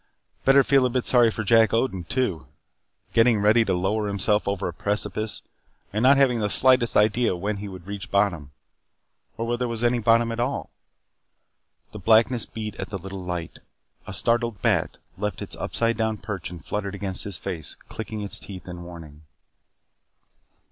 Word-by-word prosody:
Better 135 +1 +6
feel 135 -1 +4
a - - -3
bit 125 0 -1
sorry 120 -2 +5
for 110 0 -4
Jack 115 +2 +4
Odin 115 -6 0
too. 125 -5 -2 0.7
Getting 115 -1 +4
ready 110 +3 +4
to 95 -4 0
lower 105 +4 0
himself 100 +1 +1
over 100 -1 -1
a 85 - -4
precipice, 105 +4 -2 0.5
and 105 - 0
not 135 +3 +6
having 130 -4 +3
the 105 -1 0
slightest 125 0 +4
idea 105 0 +3
when 100 +4 -3
he 100 +1 -6
would 95 -3 -10
reach 100 0 -7
bottom. 95 -8 +1 0.9
Or 115 - -2
whether 120 +1 -1
there 125 - 0
was 115 0 -4
any 120 0 +2
bottom 115 +1 +3
at 115 - -4
all. 125 +4 -2 1.2
The - - -8
blackness 115 +2 +3
beat 110 -2 -6
at - - -5
the 100 - -4
little 95 +1 -8
light. 90 -2 -5 0.5
A - - -6
startled 115 -3 +1
bat - - +1 0.2
left 105 0 -2
its - - -6
upside 115 0 0
down 110 -1 0
perch 100 -6 -6
and 85 -4 -11
fluttered 100 -1 -3
against 95 -2 -3
his 100 -4 -5
face, 85 -6 -5
clicking 110 -1 -6
its 100 - 0
teeth 95 -3 -10
in 90 -1 -7
warning. 80 -4 -11
105 Hz, 175 wpm, -24 LUFS, 95-115 Hz, 1.2 s, Better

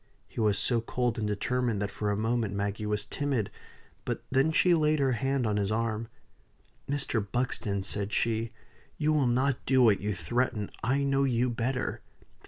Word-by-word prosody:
He - - -8
was 105 -3 +3
so 115 +3 +2
cold 120 0 -1
and 105 - -1
determined 115 +2 0
that 100 0 -2
for 105 - -2
a 100 - 0
moment 110 -2 0
Maggie 100 +1 -2
was 105 -1 -1
timid. 140 -8 -1 0.5
But - - -3 0.3
she 180 +3 +4
then 165 -2 +4
laid 155 0 +3
her 135 -2 +2
hand 135 +2 0
on 105 -1 +1
his 100 0 0
arm. 115 0 -1 0.8
"Mr. 140 -6 0
Buxton," 110 -5 -1
said 100 +1 -2
she, 115 0 0 0.5
"you 155 0 +2
will 145 -4 +3
not 130 +2 +1
do 130 -1 +5
what 110 -4 +4
you 105 0 -1
threaten. 105 +4 -1
I 135 +5 +2
know 140 0 +2
you 125 -2 +1
better. 125 +3 -2
115 Hz, 180 wpm, -29 LUFS, 105-130 Hz, 0.8 s, do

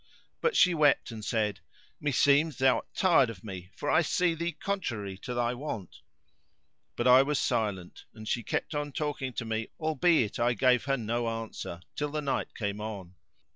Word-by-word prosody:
But 470 -3 +1
she 180 - +5
wept 150 -6 +3
and 110 -2 -8
said, 105 -4 -1 0.4
"Me 145 - -1
seems 145 +3 +3
thou 130 0 +4
art - - -7
tired 170 -10 +4
of 100 -5 -9
me, 95 -4 -8
for 145 - -6
I 160 - +4
see 175 +1 +1
thee 170 +1 -2
contrary 120 - -3
to 125 - -5
thy 120 0 +1
wont." 120 - -6 1.0
But - - -2
I 130 +1 +8
was 145 +1 0
silent; 105 -9 -2
and 110 -1 -11
she 120 - 0
kept 115 - -3
on 145 -1 -3
talking 145 -4 -2
to 120 - -4
me 110 0 -2
albeit 160 - +2
I 120 +1 +3
gave 125 -1 +3
her 135 -1 +1
no 115 0 -1
answer, 115 -6 -6
till 150 +1 -2
night 140 -2 -2
came 105 -1 -3
on. 100 -5 -6
125 Hz, 180 wpm, -29 LUFS, 110-150 Hz, 1.0 s, I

